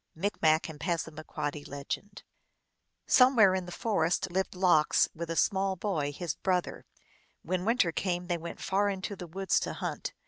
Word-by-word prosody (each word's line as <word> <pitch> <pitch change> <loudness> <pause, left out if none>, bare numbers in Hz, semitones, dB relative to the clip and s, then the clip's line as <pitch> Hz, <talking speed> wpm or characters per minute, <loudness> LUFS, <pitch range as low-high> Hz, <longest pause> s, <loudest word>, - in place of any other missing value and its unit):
(Micmac 160 -3 +1
and 155 -2 -9
Passamaquoddy.) 155 -3 -3 1.4
Somewhere 245 -7 +6
in 185 -1 -2
the - - -7
forest 180 -3 0
lived 190 +1 -1
Lox, 180 -5 +4
with 165 0 -6
a 165 - -2
small 195 +2 +1
boy, 170 -7 -2
his 165 +1 -4
brother. 180 -2 -2 0.6
When 185 +1 -2
winter 225 -6 +3
came 180 +1 -2
they 175 -1 -2
went 170 +1 -7
far 200 +1 +1
into 195 +1 -4
the 180 -2 -8
woods 190 +3 0
to - - -3
hunt. - - -4
180 Hz, 150 wpm, -30 LUFS, 165-195 Hz, 1.4 s, Somewhere